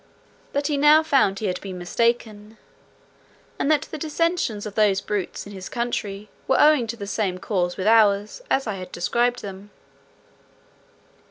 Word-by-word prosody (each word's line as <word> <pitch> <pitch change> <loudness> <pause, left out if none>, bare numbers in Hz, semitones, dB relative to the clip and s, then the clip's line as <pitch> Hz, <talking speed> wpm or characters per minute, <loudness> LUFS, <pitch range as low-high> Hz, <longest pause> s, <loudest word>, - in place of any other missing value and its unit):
But 285 0 -1
he 295 -1 0
now 300 +2 +6
found 270 -10 +2
he 215 - -4
had 180 -2 -2
been 190 -2 -7
mistaken, 215 +2 -1 1.0
and 280 - 0
that 305 -2 +3
the 310 - -5
dissensions 315 - -1
of 210 - -6
those 205 -3 +3
brutes 200 -2 -4
in 205 - -10
his 190 -1 -8
country 210 -4 -3 0.2
were 265 - +3
owing 300 -6 +5
to 235 +1 -5
the 200 - -6
same 200 -3 -2
cause 180 -2 -2
with 185 - -3
ours, 210 - +3
as 270 - +1
I 215 -4 -3
had 185 -1 -8
described 240 +8 0
them. 195 0 -8
215 Hz, 165 wpm, -23 LUFS, 195-265 Hz, 1.0 s, now